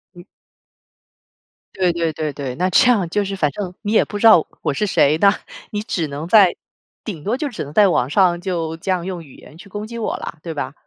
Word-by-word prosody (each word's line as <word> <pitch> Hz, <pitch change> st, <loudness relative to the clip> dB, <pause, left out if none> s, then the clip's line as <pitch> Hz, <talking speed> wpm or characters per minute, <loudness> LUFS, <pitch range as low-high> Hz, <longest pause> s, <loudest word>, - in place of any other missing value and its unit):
嗯。 175 Hz, -, -12 dB, 1.5 s
对 185 Hz, -2 st, +2 dB
对 165 Hz, -1 st, -1 dB
对 155 Hz, -1 st, -3 dB
对， 135 Hz, -3 st, -5 dB
那 180 Hz, +5 st, 0 dB
这 185 Hz, -, +5 dB
样 200 Hz, -7 st, +1 dB
就 205 Hz, +4 st, 0 dB
是 195 Hz, 0 st, -4 dB
反 155 Hz, -6 st, +1 dB
正 180 Hz, +4 st, -5 dB
你 210 Hz, -, -3 dB
也 220 Hz, -, +4 dB
不 205 Hz, -, -6 dB
知 205 Hz, -, -1 dB
道 215 Hz, -8 st, +7 dB, 0.2 s
我 -, -, -1 dB
是 210 Hz, +9 st, -1 dB
谁， 155 Hz, -5 st, +3 dB
那 200 Hz, -, +6 dB, 0.4 s
你 210 Hz, -, -2 dB
只 170 Hz, -7 st, -2 dB
能 145 Hz, +3 st, -6 dB
在 195 Hz, -2 st, +6 dB, 0.5 s
顶 175 Hz, -9 st, -6 dB
多 225 Hz, +5 st, -1 dB
就 295 Hz, -, -2 dB
只 245 Hz, -, -5 dB
能 145 Hz, -, -9 dB
在 205 Hz, +4 st, +6 dB
网 135 Hz, -8 st, +1 dB
上， 175 Hz, +1 st, +3 dB
就 170 Hz, -4 st, -3 dB
这 170 Hz, -, -7 dB
样 180 Hz, -2 st, -1 dB
用 180 Hz, -3 st, -5 dB
语 140 Hz, -4 st, -16 dB
言 155 Hz, -, -15 dB
去 190 Hz, +4 st, -14 dB
攻 205 Hz, +2 st, -6 dB
击 235 Hz, +2 st, -8 dB
我 225 Hz, -, -2 dB
了， 165 Hz, -, -7 dB
对 165 Hz, 0 st, -6 dB
吧？ 145 Hz, -, -4 dB
180 Hz, 255 characters per minute, -20 LUFS, 160-205 Hz, 1.5 s, 道